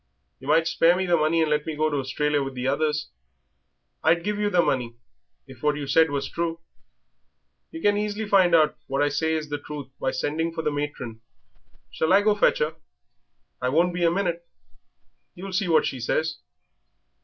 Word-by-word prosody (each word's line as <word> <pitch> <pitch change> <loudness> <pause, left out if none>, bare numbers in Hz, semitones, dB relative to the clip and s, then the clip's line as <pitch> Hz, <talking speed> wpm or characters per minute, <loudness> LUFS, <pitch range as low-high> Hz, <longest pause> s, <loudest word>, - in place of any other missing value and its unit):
Yer 135 - -11
might 160 +2 +4
spare 165 +1 +4
me 190 +1 -1
the 175 -1 +3
money 160 +1 +2
and 155 - -1
let 150 0 +1
me 160 - -3
go 155 +1 +1
to 145 -2 -1
Australia 145 +2 0
with 135 -1 -5
the 125 +1 -3
others." 150 +1 0 0.9
"I'd 170 +2 +3
give 210 0 -2
yer 210 0 +1
the 180 -3 +3
money 120 -3 -1 0.5
if 130 -3 -14
what 150 -1 +1
you 145 -1 -4
said 160 +3 +4
was 140 -1 -2
true." 165 -1 -3 1.1
"Yer 325 - -9
can 205 0 +3
easily 210 +1 -2
find 185 -4 +5
out 155 -2 +4
what 135 +1 0
I 145 - +2
say 160 +3 0
is 155 -1 -4
the 145 0 -3
truth 145 -2 -8
by - - 0
sending 160 +6 -2
for 160 - -3
the 150 - 0
matron. 145 -6 -5 0.7
Shall 160 +3 +1
I 200 +1 +5
go 215 - +4
and 205 - -1
fetch - - +4
her? 155 +2 -2 0.8
I 125 - 0
won't 170 +6 +2
be 175 0 -2
a 170 - +5
minute; 170 -1 -2 0.9
you'll 190 +2 -8
see 190 +1 0
what 165 -2 +3
she 130 - -3
says." 155 +6 -1
160 Hz, 200 wpm, -25 LUFS, 145-175 Hz, 1.1 s, find